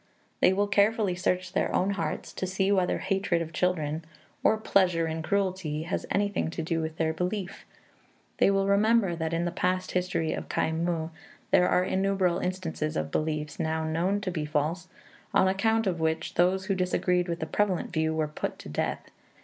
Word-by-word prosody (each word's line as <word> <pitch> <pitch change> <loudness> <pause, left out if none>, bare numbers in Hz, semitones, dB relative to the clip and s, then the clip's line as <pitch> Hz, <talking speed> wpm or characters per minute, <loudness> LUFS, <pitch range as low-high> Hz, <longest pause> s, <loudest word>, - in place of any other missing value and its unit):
They - - +5
will 200 +2 +2
carefully 205 -1 +2
search 180 0 -1
their - - +1
own 190 +2 +2
hearts 200 - -3
to 185 - -3
see 190 +1 +1
whether 185 -3 +2
hatred 195 -3 0
of 165 -1 -5
children 160 -4 0 0.4
or 220 - +4
pleasure 185 -6 +2
in 160 0 -3
cruelty 185 -4 -1
has 170 - -3
anything 200 -4 0
to 165 0 -4
do 165 0 -1
with 160 0 -4
their 160 -1 +1
belief. 180 +3 -4 0.7
They - - +5
will 195 0 +2
remember 200 -1 +3
that 160 -1 -2
in 165 +1 0
the 175 - -1
past 185 +1 -1
history 180 -3 0
of - - -6
Khai 160 - 0
muh 165 0 -1 0.4
there 180 - +5
are 180 - +3
innumerable 190 -2 +1
instances 170 -4 -2
of 80 0 -2
beliefs, 150 - -2
now 160 0 0
known 170 +6 0
to 190 -3 -2
be 160 -3 -2
false, 155 +4 -1 0.5
on 190 - +5
account 220 +4 +2
of 180 -4 0
which 160 0 -1
those 185 +2 +2
who 195 - +1
disagreed 180 -1 +1
with 170 -1 -3
the 160 - -2
prevalent 190 +1 0
view 160 -1 +1
were 155 -1 0
put 150 - -4
to - - -10
death. - - -3
180 Hz, 190 wpm, -28 LUFS, 160-195 Hz, 0.7 s, They